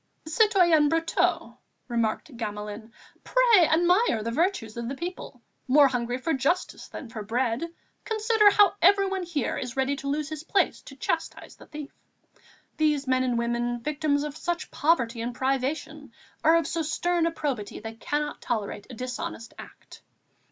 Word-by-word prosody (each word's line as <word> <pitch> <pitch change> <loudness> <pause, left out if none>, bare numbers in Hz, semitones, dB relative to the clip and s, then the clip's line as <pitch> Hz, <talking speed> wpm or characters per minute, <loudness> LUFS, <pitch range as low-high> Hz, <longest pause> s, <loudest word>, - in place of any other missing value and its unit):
"Citoyen 345 -4 +4
Brotteaux," 330 +1 0 0.3
remarked 235 +3 -2
Gamelin, 210 0 -6 0.3
"pray 470 -9 +5
admire 345 - +3
the 230 - -2
virtues 315 - -1
of 235 0 -4
the 275 - -4
people, 340 -6 -7 0.2
more 280 +2 +6
hungry 245 -1 -2
for 290 +6 -1
justice 295 +7 -1
than 265 - -8
for 225 -1 -7
bread; 230 +4 -1 0.4
consider 435 -1 +4
how 405 -2 +5
everyone 390 0 +4
here 335 -7 -2
is 250 +1 -6
ready 265 +1 +1
to 280 - -6
lose 295 +1 -1
his 310 -1 -6
place 385 +4 +1
to 275 - -12
chastise 325 +4 -3
the - - -16
thief. 300 -2 -8 0.9
These 300 -2 +1
men 255 -1 +2
and 245 -2 0
women, 240 +1 -1
victims 295 0 0
of 295 -1 -5
such 345 +2 -3
poverty 245 -7 +1
and 240 +1 -4
privation, 275 +1 -2 0.3
are 320 +1 +6
of 335 -2 +2
so 330 - -2
stern 335 +2 0
a - - 0
probity 270 -10 -4
they 225 +1 -7
cannot 295 +6 -3
tolerate 210 -3 -3
a 250 - -8
dishonest 250 -1 -6
act." - - -13
285 Hz, 160 wpm, -26 LUFS, 240-335 Hz, 0.9 s, more